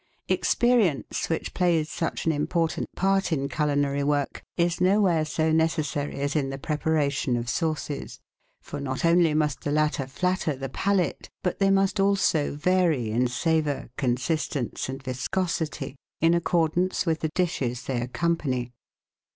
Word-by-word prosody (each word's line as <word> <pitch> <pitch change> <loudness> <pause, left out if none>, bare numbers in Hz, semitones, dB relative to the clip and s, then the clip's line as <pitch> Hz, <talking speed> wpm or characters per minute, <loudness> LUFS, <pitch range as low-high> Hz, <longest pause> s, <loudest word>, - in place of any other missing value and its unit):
Experience, 230 - +2
which 165 - -2
plays 170 -4 +2
such 165 +1 -3
an 165 - +3
important 160 +2 -1
part 195 0 +1
in 140 -3 0
culinary 145 -1 0
work, 145 -1 0 0.2
is 170 0 +1
nowhere 185 -4 +3
so 155 +1 0
necessary 155 -3 0
as 140 +2 -1
in 140 -3 +1
the 135 - -4
preparation 145 -3 0
of 120 0 -4
sauces, 155 0 -2 0.4
for 145 - -6
not 135 +1 -2
only 170 -2 +4
must 150 -3 0
the - - -3
latter 150 -3 +1
flatter 180 +1 -1
the 135 0 -5
palate, 190 +5 0
but 180 - -1
they 195 -1 +4
must 195 +1 +2
also 195 -7 +2
vary 160 -7 +2
in 125 +3 +2
savour, 145 0 0
consistence 130 0 -1
and 135 +1 -6
viscosity, 150 +4 -2 0.2
in 165 +1 +4
accordance 170 +2 +1
with 165 -2 +1
the 160 - -1
dishes 130 -9 -1
they 125 -3 -2
accompany. 130 -2 -1
155 Hz, 145 wpm, -26 LUFS, 140-170 Hz, 0.4 s, only